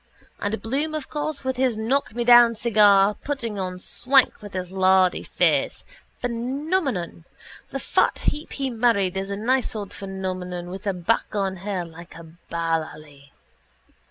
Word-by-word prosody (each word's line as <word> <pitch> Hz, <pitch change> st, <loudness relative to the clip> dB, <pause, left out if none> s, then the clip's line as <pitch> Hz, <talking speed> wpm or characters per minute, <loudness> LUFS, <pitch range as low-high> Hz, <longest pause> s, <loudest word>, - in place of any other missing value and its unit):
And 210 Hz, +2 st, -2 dB
Bloom, 290 Hz, +7 st, -2 dB
of 305 Hz, -3 st, -5 dB
course, 295 Hz, -1 st, -3 dB
with 260 Hz, -1 st, -2 dB
his 255 Hz, -4 st, +1 dB
knockmedown 240 Hz, 0 st, +4 dB
cigar 210 Hz, -3 st, +5 dB
putting 230 Hz, -3 st, -4 dB
on 185 Hz, -1 st, -3 dB
swank 260 Hz, +8 st, +2 dB
with 205 Hz, -1 st, -10 dB
his 180 Hz, -1 st, -4 dB
lardy 190 Hz, -1 st, +3 dB
face. -, -, 0 dB, 0.4 s
Phenomenon! 250 Hz, -, -2 dB, 0.4 s
The -, -, -4 dB
fat -, -, +1 dB
heap 300 Hz, +1 st, -2 dB
he 270 Hz, -2 st, -2 dB
married 220 Hz, -6 st, +1 dB
is 195 Hz, +1 st, -3 dB
a 200 Hz, -, -2 dB
nice 240 Hz, +4 st, 0 dB
old 205 Hz, -2 st, -5 dB
phenomenon 185 Hz, -2 st, -5 dB
with 190 Hz, +2 st, -7 dB
a 200 Hz, -, +1 dB
back 180 Hz, +5 st, -1 dB
on 195 Hz, -2 st, -1 dB
her 190 Hz, -1 st, -3 dB
like 170 Hz, +1 st, -12 dB
a 170 Hz, -, -10 dB, 0.3 s
ballalley. 155 Hz, -4 st, -4 dB
205 Hz, 145 wpm, -24 LUFS, 185-245 Hz, 0.4 s, cigar